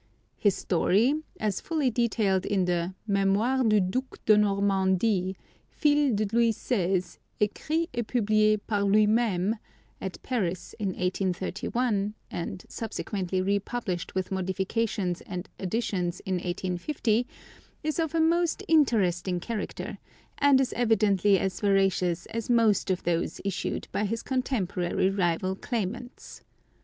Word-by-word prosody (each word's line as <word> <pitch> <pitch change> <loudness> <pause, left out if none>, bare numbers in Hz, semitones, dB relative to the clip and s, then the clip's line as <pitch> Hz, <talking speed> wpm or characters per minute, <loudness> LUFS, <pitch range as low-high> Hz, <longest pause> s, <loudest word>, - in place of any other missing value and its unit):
His 205 -3 +3
story, 200 - +2 0.3
as 210 -3 -1
fully 305 -6 0
detailed 215 -5 +1
in 195 -3 +1
the 175 +1 -1
"Mémoires 210 +5 +2
du 215 -1 +5
Duc 250 +8 -2
de 215 - +7
Normandie, 195 -1 +2 0.3
fils 290 -3 +2
de 215 +1 +1
Louis 235 -1 +4
XVI., 185 -5 -1 0.2
écrits 310 +10 0
et 240 - 0
publié 215 -2 +3
par 205 -3 0
lui 210 +2 +5
même," 215 -2 +1 0.4
at 190 -2 -5
Paris 190 -9 -2
in 205 - -1
1831, 195 +4 -1 0.2
and 185 +2 -5
subsequently 190 -4 -3
republished 200 -2 -2
with 185 0 -2
modifications 190 0 -1
and 180 -2 -5
additions 185 -3 -1
in 190 -1 -1
1850, 185 - -1 0.6
is 310 +2 -1
of 325 -1 -1
a - - +3
most 340 +3 +2
interesting 190 - +2
character, 215 +3 -5 0.4
and 280 -2 +5
is 265 - 0
evidently 205 -4 +3
as 185 0 -2
veracious 195 -4 +2
as 230 0 -3
most 230 -5 +3
of 185 -1 0
those 170 -1 -1
issued 195 -2 -2
by 210 - 0
his 225 +3 -3
contemporary 195 -8 0
rival 185 0 0
claimants. 240 +3 -5
205 Hz, 125 wpm, -27 LUFS, 185-235 Hz, 0.6 s, de